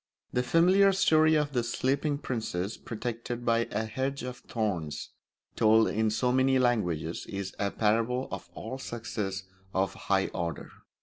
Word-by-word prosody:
The 125 - +2
familiar 185 +8 +5
story 160 -5 +4
of 150 -2 +1
the 120 -2 +1
Sleeping 140 +5 0
Princess 110 -8 -3
protected 120 +1 -5
by 115 0 +3
a 110 +2 -1
hedge 130 +5 -3
of 125 0 -5
thorns, 90 - -3 0.4
told 110 +1 +5
in 110 +1 +1
so 125 +3 +1
many 130 +1 +3
languages, 90 -10 0
is 100 -1 -4
a 100 - +1
parable 115 +5 +1
of - - -6
all 130 - -6
success 105 -6 -4 0.3
of 95 +1 +1
a - - -14
high 95 -1 +1
order. 85 -3 -4
115 Hz, 150 wpm, -29 LUFS, 105-130 Hz, 0.4 s, familiar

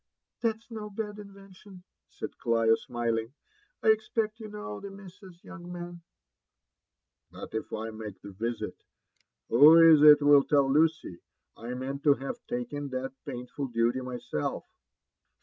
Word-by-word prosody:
''That's 230 0 -2
no 215 -2 -6
bad 210 0 -5
invention/' 195 -2 -14 0.3
said - - -7
CHo, 115 -1 +3
smiling. 115 +1 -3 0.5
''I 220 - +6
expect 220 0 -1
you 220 - -8
know 205 - -7
the 200 - -8
Missas, 190 -2 -14
young 180 -1 -10
man." 175 -1 -8 1.3
"But - - -10
if 110 - -4
I 110 +1 -4
make 110 -2 -9
this 100 -1 -11
risit, 115 0 -3 0.8
who 150 +7 +8
is 165 -2 +7
it 150 -1 +8
will 145 -1 +7
tell 140 -1 +2
Lucy?— 155 - +1 0.4
•! 120 +2 -6
nieant 135 +2 -5
to 145 -2 +6
have 140 - -7
taken 240 - -4
that 130 0 -4
painful 125 +1 -5
duty 120 +1 0
myself." 125 - -4
145 Hz, 140 wpm, -28 LUFS, 120-195 Hz, 1.3 s, who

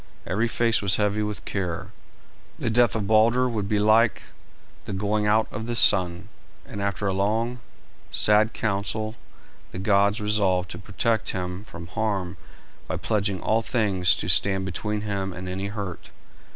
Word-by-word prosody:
Every 110 +5 0
face 115 0 +2
was 100 -2 +1
heavy 105 0 +1
with 105 -1 -4
care. 90 -4 -3 0.7
The 115 - -1
death 120 +1 +3
of 105 -2 -1
Balder 115 +4 +4
would 105 -5 -2
be 105 - +2
like 110 +2 +3 0.6
the - - -5
going 105 +2 0
out 110 +1 +3
of 110 +2 -5
the 120 - -2
sun, 90 -6 +3 0.4
and 100 - -7
after 100 0 -2
a 95 - +1
long, 110 +5 0 0.5
sad 105 +1 +3
council 110 +1 -2 0.6
the - - -7
gods 100 +1 +2
resolved 100 -4 +1
to - - -7
protect 115 -2 -1
him 90 +1 -4
from 85 -5 -10
harm 95 -2 -2 0.5
by - - -2
pledging 100 +1 -1
all 110 +1 +2
things 95 -7 +2
to - - -4
stand 95 +1 +2
between 105 +3 -3
him 100 -2 -3
and 90 +1 -7
any 95 +2 -3
hurt. 100 -4 -6
105 Hz, 160 wpm, -25 LUFS, 95-110 Hz, 0.7 s, Balder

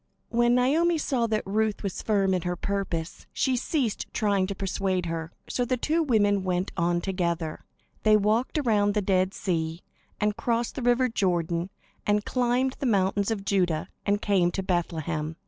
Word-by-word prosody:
When 240 +1 +3
Naomi 320 +7 +3
saw 255 -6 0
that 215 -1 -1
Ruth 215 +2 0
was 195 -3 -3
firm 195 -3 +2
in 180 - 0
her 175 +1 -2
purpose, 180 -3 -3
she 260 -2 +1
ceased 250 - -1
trying 200 -3 +1
to 200 - -4
persuade 190 -1 -1
her; 165 -1 -4 0.2
so 250 - -1
the 250 +1 0
two 315 +7 +1
women 205 -8 +2
went 180 0 -1
on 175 +1 +1
together. 170 -4 -2 0.4
They 215 -1 +5
walked 215 +7 +1
around 210 -7 +2
the 210 - +1
Dead 185 -1 +2
Sea, 165 -2 -2 0.4
and 210 0 +1
crossed 235 +1 -1
the 270 - -5
river 245 +1 +3
Jordan, 175 -5 0 0.3
and 210 0 +1
climbed 250 +1 +1
the 270 - -1
mountains 200 -1 +2
of 205 -3 -3
Judah, 180 -5 +1
and 205 0 0
came 190 -4 +3
to 195 - -2
Bethlehem. 165 -3 -2
200 Hz, 170 wpm, -27 LUFS, 180-235 Hz, 0.4 s, They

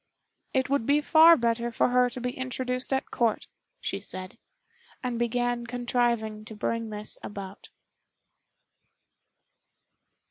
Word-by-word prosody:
"It 260 -1 +1
would 275 -4 0
be 285 +1 +4
far 320 +2 +7
better 235 0 0
for 235 - +2
her 250 0 +4
to 250 +1 -7
be 250 0 -2
introduced 255 0 -3
at 265 0 -1
Court," 230 -3 +1 0.3
she 195 - -3
said, 185 -2 -8 0.6
and 245 -2 -2
began 240 0 0
contriving 240 -3 0
to 220 -1 -9
bring 230 +1 -2
this 210 0 -5
about. 200 -1 -8
240 Hz, 120 wpm, -27 LUFS, 220-250 Hz, 0.6 s, far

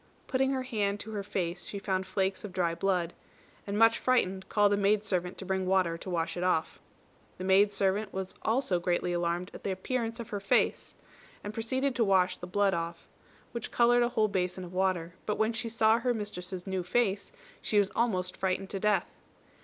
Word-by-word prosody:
Putting 265 0 +1
her 265 -1 -1
hand 205 -5 -1
to 220 - -7
her 210 -2 -3
face, 180 -3 -3
she 205 - -4
found 190 -1 -2
flakes 190 -1 -1
of 210 - -6
dry 175 -2 +1
blood; 180 -1 0 0.5
and 200 +1 -2
much 225 +1 +5
frightened 190 -7 +1
called 205 -1 +4
a - - +4
maid 205 +1 +2
servant 180 -3 -2
to 190 - -6
bring 190 0 -1
water 185 -3 +2
to 165 - -8
wash 170 -2 -1
it 175 - -3
off. 170 -3 0 0.6
The 185 - -6
maid 195 +2 +5
servant 200 +1 0
was 190 0 -4
also 220 -6 +1
greatly 175 0 0
alarmed 175 +1 -1
at - - -10
the - - -2
appearance 230 +4 -2
of 235 - -6
her 205 - -3
face, 195 - +1 0.5
and 205 - -5
proceeded 260 +5 0
to 235 - +4
wash 185 -3 +3
off - - -27
the 180 - -5
blood, 180 -3 +1 0.6
which 235 -2 -5
coloured 240 0 +4
a 240 - +3
whole 220 -3 +2
basin 185 -2 -2
of 180 0 -9
water; 180 -2 0
but 210 - 0
when 220 +1 +1
she 230 +1 -2
saw 225 0 +3
her 245 0 0
mistress's 185 -4 -5
new 190 -1 -2
face 200 +2 0 0.3
she 210 - 0
was 200 -1 +3
almost 185 -6 0
frightened 190 0 -1
to 195 - -3
death. 205 -3 +1
195 Hz, 205 wpm, -30 LUFS, 185-220 Hz, 0.6 s, much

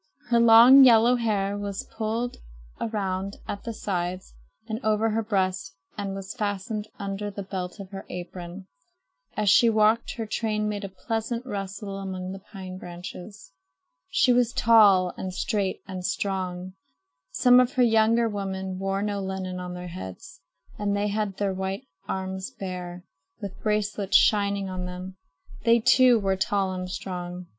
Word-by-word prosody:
Her 235 -1 +4
long 235 +4 +9
yellow 240 0 +6
hair 205 -4 0
was 200 -1 -4
pulled 225 +2 -2 0.4
around 195 -3 -2
at 200 - -5
the 230 - -3
sides 185 -4 -4 0.3
and 220 -1 -3
over 220 +1 +2
her 225 +1 0
breast 190 -6 -1 0.2
and 200 -2 -4
was 195 0 -6
fastened 210 -1 -3
under 200 0 -4
the 200 0 -6
belt 185 0 -5
of 195 -1 -9
her 195 -1 -8
apron. 180 +1 -7 0.7
As 210 -1 0
she 230 +5 +6
walked, 220 +1 +2
her 225 - -4
train 215 -1 -1
made 205 -1 -3
a 195 - -4
pleasant 225 +5 -3
rustle 200 -2 -5
among 185 -1 -5
the 195 - -7
pine 185 -2 -8
branches. 180 -2 -9 0.6
She 250 - +4
was 240 -1 +2
tall 205 -6 +5
and 190 - -4
straight 200 -3 -1
and 185 -1 -6
strong. 185 -1 -3 0.6
Some 250 0 +5
of 250 +2 +2
her 255 -3 +3
younger 230 0 +4
women 190 -3 -4
wore 195 +1 -1
no 205 -1 -2
linen 190 -1 -4
on 180 0 -6
their 180 0 -7
heads 145 - -9 0.4
and 205 -1 0
had 205 -1 -1
their 200 -2 0
white 190 +1 -4 0.2
arms 190 +1 -4
bare, 180 -6 -7 0.4
with 195 -2 -8
bracelets 210 -2 +2
shining 200 -2 +2
on 185 -1 -4
them. 185 +1 -7 0.5
They, 230 +1 +5
too, 250 +1 +5
were 195 -2 +1
tall 195 0 0
and 185 0 -5
strong. 180 -1 -6
200 Hz, 155 wpm, -26 LUFS, 185-220 Hz, 0.7 s, long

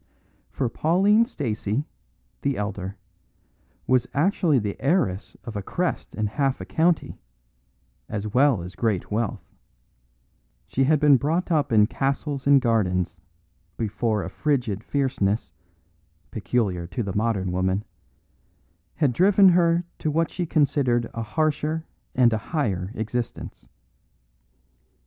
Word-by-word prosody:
For 130 - -2
Pauline 195 - +3
Stacey, 120 - -2 0.6
the 140 -2 0
elder, 100 -1 -4 0.9
was 125 -1 +2
actually 165 -1 +2
the 105 -4 -2
heiress 135 - 0
of 115 -2 -8
a 100 - -2
crest 175 - -3
and 110 -1 0
half 135 +4 -1
a - - -6
county, 165 +1 0 0.9
as 105 -1 -3
well 125 -3 +3
as 90 +1 -8
great 100 -1 -1
wealth; 110 0 -2 1.2
she 135 - 0
had 155 +1 +3
been 145 -2 +6
brought 165 +7 -1
up 145 -4 +1
in 105 -2 +6
castles 140 +3 -2
and 140 -1 +7
gardens, 90 -8 0 0.6
before 110 -1 -1
a - - -5
frigid 120 -9 -1
fierceness 125 -7 -1 0.8
(peculiar 100 -6 -1
to 100 +7 -3
the 95 -2 -4
modern 105 -4 0
woman) 95 +2 0 1.1
had 145 -6 +1
driven 195 - +6
her 170 -1 +3 0.2
to 155 - -1
what 165 +2 0
she 175 -2 -3
considered 135 -6 +2
a 115 - -4
harsher 155 +7 -1 0.3
and 120 -2 +4
a 110 - 0
higher 100 - -2
existence. 115 +2 -5
125 Hz, 125 wpm, -24 LUFS, 105-150 Hz, 1.2 s, and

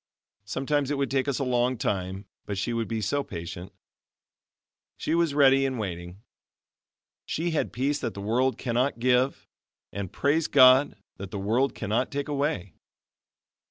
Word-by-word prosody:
Sometimes 135 +5 -1
it 145 - -1
would 140 -1 -1
take 135 0 +1
us 140 - 0
a 140 - -1
long 125 0 +1
time, 95 -1 -2 0.2
but 100 - -3
she 120 +4 -1
would 115 -1 -1
be 110 -1 -2
so 140 +8 0
patient. 85 0 -7 1.3
She - - -2
was 165 -4 +1
ready 135 -1 +5
and 135 -2 -1
waiting. 90 -1 -6 1.0
She 170 +2 -2
had 160 - -1
peace 140 +4 -1
that 115 - -4
the - - -6
world 125 +6 +1
cannot 125 +2 0
give, 125 +2 +1 0.4
and, 100 -2 -5
praise 150 +3 +1
God! 130 +2 +6 0.2
that 100 -1 -7
the 100 - -5
world 115 +8 +1
cannot 115 +5 -1
take 140 0 -3
away. 140 - -2
125 Hz, 160 wpm, -27 LUFS, 100-140 Hz, 1.3 s, God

